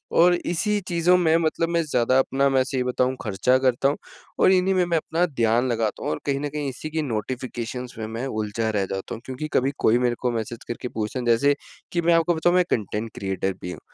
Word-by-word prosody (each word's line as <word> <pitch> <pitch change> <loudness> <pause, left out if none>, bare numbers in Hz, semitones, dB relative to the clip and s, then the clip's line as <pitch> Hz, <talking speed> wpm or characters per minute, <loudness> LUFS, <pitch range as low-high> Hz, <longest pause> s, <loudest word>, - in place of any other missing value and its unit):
और 175 +1 +6
इसी 180 +5 0
चीज़ों 175 +1 +3
में 165 -3 +3
मतलब 165 0 0
मैं 170 0 +2
ज़्यादा 130 -4 +2
अपना 135 +1 +2
मैं 135 -1 +3
ये 130 -1 +1
बताऊँ 125 +1 0
खर्चा 110 +5 +2
करता 130 0 +2
हूँ 145 - 0 0.4
और - - +6
इन्हीं 190 0 +3
में 185 -1 +2
मैं 170 -1 +1
अपना 165 +2 0
ध्यान 120 -5 +1
लगाता 115 -3 -1
हूँ, - - -1
और 75 - -3
कहीं 140 -1 0
न 145 +1 -3
कहीं 145 -1 -3
इसी 135 +4 -7
की 160 +1 -1
नोटिफिकेशंस 125 0 -4
में 110 - -4
मैं 115 +3 -4
उलझा 110 -1 -2
रह 100 -3 0
जाता 95 0 -5
हूँ 115 - -11
क्योंकि 130 +4 -5
कभी 135 +2 +2
कोई 115 - +3
मेरे 120 -1 +1
को 125 -1 +1
मैसेज 115 0 -4
करके 120 +1 -4
पूछता, 110 +3 -3
जैसे 120 +5 +3 0.4
कि 170 - 0
मैं 170 0 +3
आपको 165 +1 +3
बताऊँ 175 +2 +2
मैं 180 - +5
कॉन्टेंट 110 +1 -2
क्रिएटर 95 0 -2
भी 90 - -5
हूँ। - - -8
130 Hz, 230 wpm, -24 LUFS, 115-160 Hz, 0.4 s, और